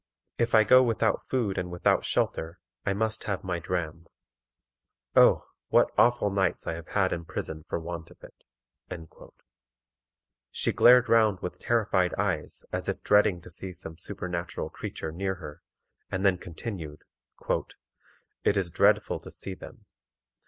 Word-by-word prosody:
If 115 Hz, -1 st, +2 dB
I 110 Hz, -, +7 dB
go 130 Hz, +4 st, +7 dB
without 115 Hz, -2 st, +1 dB
food 115 Hz, -8 st, 0 dB
and 90 Hz, 0 st, -4 dB
without 90 Hz, 0 st, +2 dB
shelter, 80 Hz, +2 st, -1 dB, 0.3 s
I 100 Hz, -, +3 dB
must 110 Hz, +2 st, -1 dB
have 100 Hz, -3 st, -2 dB
my 90 Hz, -2 st, -2 dB
dram. 85 Hz, -1 st, -4 dB, 1.1 s
Oh! -, -, +6 dB, 0.2 s
what -, -, +4 dB
awful 120 Hz, -4 st, +3 dB
nights 95 Hz, -2 st, 0 dB
I -, -, -2 dB
have 80 Hz, 0 st, -8 dB
had 95 Hz, -2 st, +1 dB
in 85 Hz, -, -4 dB
prison 80 Hz, -1 st, -5 dB
for -, -, -1 dB
want 85 Hz, 0 st, -6 dB
of -, -, -17 dB
it." -, -, -12 dB, 2.2 s
She -, -, 0 dB
glared 125 Hz, 0 st, +7 dB
round 110 Hz, -5 st, +3 dB
with 90 Hz, -, -5 dB
terrified 100 Hz, -6 st, +1 dB
eyes 95 Hz, -6 st, -2 dB
as -, -, -2 dB
if -, -, -4 dB
dreading 105 Hz, -3 st, +4 dB
to 90 Hz, -, -13 dB
see 95 Hz, +2 st, -6 dB
some 80 Hz, -1 st, -7 dB
supernatural 90 Hz, -2 st, -4 dB
creature 80 Hz, -, -6 dB
near 95 Hz, +3 st, -2 dB
her, 75 Hz, -4 st, -10 dB, 0.5 s
and 95 Hz, +1 st, -2 dB
then 95 Hz, -3 st, +3 dB
continued: 85 Hz, -4 st, -7 dB, 1.4 s
"It 100 Hz, -, +2 dB
is 90 Hz, -3 st, -1 dB
dreadful -, -, +3 dB
to -, -, -11 dB
see 95 Hz, -, -6 dB
them. -, -, -12 dB
95 Hz, 150 wpm, -28 LUFS, 85-105 Hz, 2.2 s, I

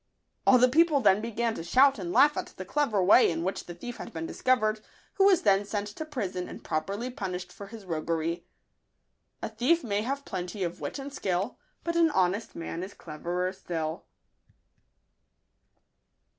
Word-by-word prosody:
All 255 Hz, -, +8 dB
the 250 Hz, +1 st, +6 dB
people 310 Hz, +2 st, +4 dB
then 205 Hz, -4 st, +4 dB
began 230 Hz, 0 st, -1 dB
to 165 Hz, -, -6 dB
shout 260 Hz, +8 st, +4 dB
and 175 Hz, -2 st, -4 dB
laugh 295 Hz, +9 st, +5 dB
at -, -, -3 dB
the 185 Hz, -, -6 dB
clever 215 Hz, -3 st, +1 dB
way 205 Hz, +7 st, +6 dB
in 165 Hz, 0 st, -2 dB
which 190 Hz, +2 st, -3 dB
the 175 Hz, -, -8 dB
thief 240 Hz, +7 st, -7 dB
had -, -, -8 dB
been 165 Hz, 0 st, -5 dB
discovered, 215 Hz, 0 st, +1 dB, 0.4 s
who 390 Hz, -, +5 dB
was 385 Hz, -4 st, +5 dB
then 200 Hz, -1 st, +4 dB
sent 205 Hz, 0 st, -3 dB
to 310 Hz, +9 st, -6 dB
prison 195 Hz, -, -4 dB
and -, -, -10 dB
properly 195 Hz, +10 st, -2 dB
punished 180 Hz, -5 st, -5 dB
for 200 Hz, -, -9 dB
his 220 Hz, -1 st, -11 dB
roguery. 165 Hz, 0 st, -2 dB, 1.0 s
A -, -, -2 dB
thief 250 Hz, +10 st, +2 dB
may 205 Hz, -3 st, 0 dB
have 275 Hz, +5 st, -3 dB
plenty 185 Hz, +1 st, -4 dB
of 170 Hz, -1 st, -4 dB
wit -, -, -4 dB
and 275 Hz, 0 st, -7 dB
skill, 190 Hz, -2 st, -2 dB, 0.2 s
But 335 Hz, 0 st, -2 dB
an 335 Hz, -1 st, +5 dB
honest 195 Hz, -4 st, 0 dB
man 165 Hz, 0 st, -5 dB
is 190 Hz, +2 st, -7 dB
cleverer 175 Hz, +4 st, -3 dB
still. 165 Hz, -3 st, -4 dB
200 Hz, 175 wpm, -28 LUFS, 180-250 Hz, 1.0 s, All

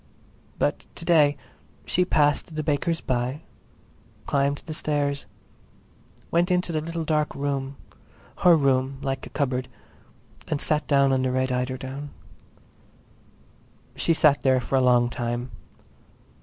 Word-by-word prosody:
But -, -, -1 dB
to 165 Hz, -, -8 dB
day 150 Hz, -4 st, +4 dB, 0.5 s
she 180 Hz, -, +1 dB
passed 150 Hz, 0 st, +1 dB
the 155 Hz, -, -2 dB
baker's 155 Hz, +3 st, 0 dB
by, 125 Hz, +4 st, -2 dB, 0.8 s
climbed 140 Hz, 0 st, 0 dB
the 155 Hz, -, -5 dB
stairs, 145 Hz, -2 st, -1 dB, 1.0 s
went 170 Hz, +2 st, +2 dB
into 180 Hz, -1 st, +1 dB
the 155 Hz, -1 st, -1 dB
little 165 Hz, +1 st, -4 dB
dark 150 Hz, -1 st, 0 dB
room—her 140 Hz, +5 st, -1 dB
room 135 Hz, -1 st, +1 dB
like 135 Hz, -1 st, -3 dB
a -, -, -12 dB
cupboard—and 130 Hz, +2 st, -5 dB
sat 150 Hz, 0 st, 0 dB
down 140 Hz, -2 st, +4 dB
on 130 Hz, -1 st, +2 dB
the 130 Hz, 0 st, 0 dB
red 130 Hz, 0 st, 0 dB
eiderdown. 130 Hz, +3 st, -3 dB, 1.9 s
She 165 Hz, -, +1 dB
sat 150 Hz, -2 st, +4 dB
there 130 Hz, -1 st, +3 dB
for 125 Hz, +2 st, -2 dB
a 130 Hz, -, +4 dB
long 120 Hz, -1 st, +4 dB
time. 120 Hz, +1 st, -3 dB
140 Hz, 125 wpm, -25 LUFS, 130-155 Hz, 1.9 s, day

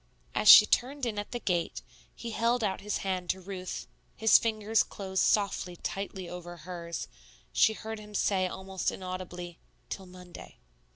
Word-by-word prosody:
As 105 Hz, -, +3 dB
she 210 Hz, -, +12 dB
turned 265 Hz, +5 st, 0 dB
in 215 Hz, -3 st, -2 dB
at 205 Hz, -, -5 dB
the 240 Hz, -, -3 dB
gate, 175 Hz, -6 st, -1 dB, 0.3 s
he 235 Hz, -, -6 dB
held 235 Hz, +2 st, +1 dB
out 195 Hz, -2 st, -1 dB
his 210 Hz, 0 st, -2 dB
hand 185 Hz, -2 st, -2 dB
to 190 Hz, -, 0 dB
Ruth. 185 Hz, -1 st, -6 dB, 0.3 s
His 220 Hz, 0 st, +6 dB
fingers 220 Hz, -1 st, +1 dB
closed 190 Hz, -2 st, -2 dB
softly, 200 Hz, -3 st, +1 dB
tightly 190 Hz, 0 st, -5 dB
over 175 Hz, 0 st, -8 dB
hers; 170 Hz, 0 st, -6 dB, 0.5 s
she 220 Hz, -, +5 dB
heard 220 Hz, 0 st, -6 dB
him 210 Hz, 0 st, -11 dB
say 190 Hz, -3 st, +2 dB
almost 190 Hz, 0 st, -3 dB
inaudibly, 180 Hz, -2 st, -6 dB, 0.3 s
"Till 190 Hz, -1 st, -5 dB
Monday." 180 Hz, -, -12 dB
190 Hz, 160 wpm, -30 LUFS, 180-215 Hz, 0.5 s, she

